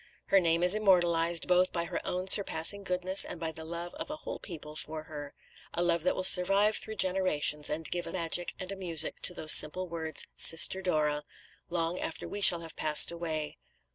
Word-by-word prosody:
Her 195 - +3
name 170 -1 -1
is 180 +1 +4
immortalised, 175 -5 0
both 180 0 +1
by 170 -1 -4
her - - -7
own 180 +1 -5
surpassing 195 0 +4
goodness, 185 +1 +1
and 175 - -10
by 165 -1 -6
the 160 0 -11
love 170 +2 -9
of - - -10
a 300 - -6
whole 310 - -10
people 155 -5 -11
for 155 0 -7
her 145 -3 -11 0.4
a 175 - -2
love 170 -1 -1
that 180 - -2
will 185 - -5
survive 195 +3 +4
through 220 - -5
generations, 185 -6 -2
and 160 +1 -5
give 175 0 -5
a - - -8
magic 175 -1 -5
and 185 +1 -8
a - - -7
music 170 -5 0
to 180 - -2
those 155 - +4
simple 185 +5 +4
words, 160 -2 -5
"Sister 165 +3 +7
Dora," 150 -5 -2 0.5
long 170 0 -4
after 160 - -8
we 205 - -8
shall 175 -3 +6
have 165 -1 -11
passed 155 +1 +2
away. 160 -3 -7
170 Hz, 200 wpm, -27 LUFS, 160-185 Hz, 0.5 s, Sister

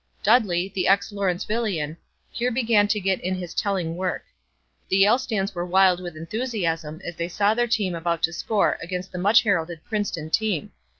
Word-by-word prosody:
Dudley, 195 -5 +3
the 185 -2 0
ex 195 +1 +3
Lawrencevillian, 195 -4 -1 0.4
here 245 +1 -1
began 225 -4 +3
to 210 +1 +1
get 190 -1 0
in 185 +1 -1
his 180 -2 -6
telling 185 -5 -1
work. 185 0 -2 0.7
The 190 - +2
Yale 205 +6 +5
stands 210 -6 -2
were 175 -1 -3
wild 185 0 +4
with 175 -3 -7
enthusiasm 165 -4 -3
as 170 - -5
they 170 +1 -3
saw 205 +3 +2
their 240 +1 +1
team 210 -5 0
about 170 -1 -2
to 160 - +2
score 205 +4 0
against 180 +2 -5
the 180 - -5
much 205 +5 +5
heralded 170 -6 -1
Princeton 200 -8 -3
team. 210 -8 0
190 Hz, 180 wpm, -24 LUFS, 175-210 Hz, 0.7 s, Yale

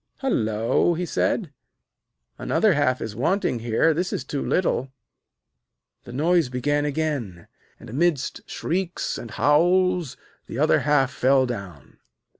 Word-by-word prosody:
'Hullo!' 115 - +1
he 180 +2 -2
said, 170 -1 -1 0.9
'another 215 -3 +2
half 140 -4 +1
is 105 -2 -5
wanting 165 - 0
here; 120 +8 +2
this 180 +4 -2
is - - -3
too 140 +1 -4
little.' 135 -7 0 1.1
The - - -9
noise 160 +2 +2
began 145 +4 0
again, 140 - -3 0.3
and, - - -12
amidst 150 +3 0
shrieks 180 +1 -3
and 120 - -8
howls, 175 - +2 0.3
the - - -7
other - - +3
half 145 -3 +2
fell 130 +1 +3
down. 100 - -8
145 Hz, 125 wpm, -24 LUFS, 125-175 Hz, 1.1 s, other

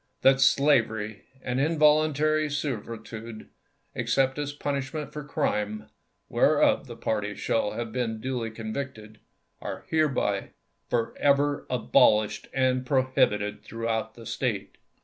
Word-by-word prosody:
That 135 0 +5
slavery 110 -8 +2 0.2
and 125 0 -1
involuntary 155 0 +3
servitude, 115 -5 -5 0.4
except 135 +1 +1
as 145 -1 -2
a 145 - -15
punishment 140 +1 -3
for 150 - -5
crime, 105 -6 -2 0.4
whereof - - +3
the - - -8
party 105 -2 -2
shall 110 -2 0
have 115 -1 -4
been 115 -2 -2
duly 125 -1 -3
convicted, 110 -1 -6 0.4
are - - -6
hereby 140 -11 0 0.4
forever 140 +4 +1
abolished 110 -3 +3
and 130 -1 +1
prohibited 125 -6 +1
throughout 115 -1 -3
the 115 - -12
State. 110 -7 -3
125 Hz, 110 wpm, -27 LUFS, 110-140 Hz, 0.4 s, That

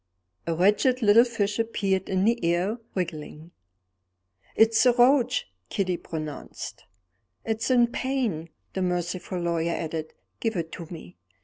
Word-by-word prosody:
A 165 - 0
wretched 210 +8 +3
little 215 +3 +7
fish 215 -3 -1
appeared 195 -4 0
in 190 0 +1
the 235 +2 +2
air, 175 +7 +1 0.2
wriggling. 160 -2 -5 1.0
"It's 225 0 +5
a 245 - +6
roach," 250 0 +3 0.2
Kitty 185 -2 0
pronounced. 155 - -7 0.6
"It's 220 +2 -1
in 245 -2 +5
pain," 235 - -2 0.2
the 190 - -2
merciful 180 0 -2
lawyer 170 -1 0
added; 160 -1 -4 0.2
"give 225 -2 -1
it 165 -2 -3
to 170 - -7
me." 155 - -10
190 Hz, 130 wpm, -26 LUFS, 170-230 Hz, 1.0 s, little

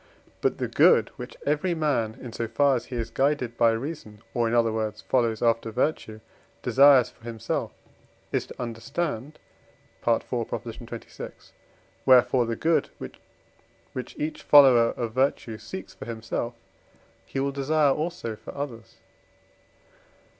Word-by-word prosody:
But - - +1
the - - -2
good - - +5
which - - -8
every 150 +5 +1
man, 130 -8 0
in 120 -3 -8
so 115 - -3
far 140 +4 +3
as 120 - -3
he 125 - -7
is 115 -1 -3
guided 135 -2 0
by 115 -1 +4
reason, 115 -3 -5
or, 120 -1 +1
in 115 - 0
other 115 -2 +3
words, 110 -1 -3
follows 115 -4 +1
after 115 -1 +2
virtue, 110 -3 -2 0.4
desires 135 -3 +6
for 115 - -27
himself, 115 -3 -3 0.6
is - - -1
to - - -12
understand 125 +4 -4 0.6
(IV. - - +2
xxvi.); - - -6 0.6
wherefore 125 -1 +5
the 115 - -1
good, 165 +5 +1 1.0
which 125 -1 -6
each 155 +1 -3
follower 130 -5 +7
of 115 -2 -3
virtue 125 -4 0
seeks 95 0 -8
for - - -10
himself, 115 +1 -4 0.7
he 135 - -5
will 140 +1 0
desire 140 +1 +2
also 155 -8 -3
for - - -11
others. 115 -6 -6
120 Hz, 140 wpm, -26 LUFS, 115-140 Hz, 1.0 s, follower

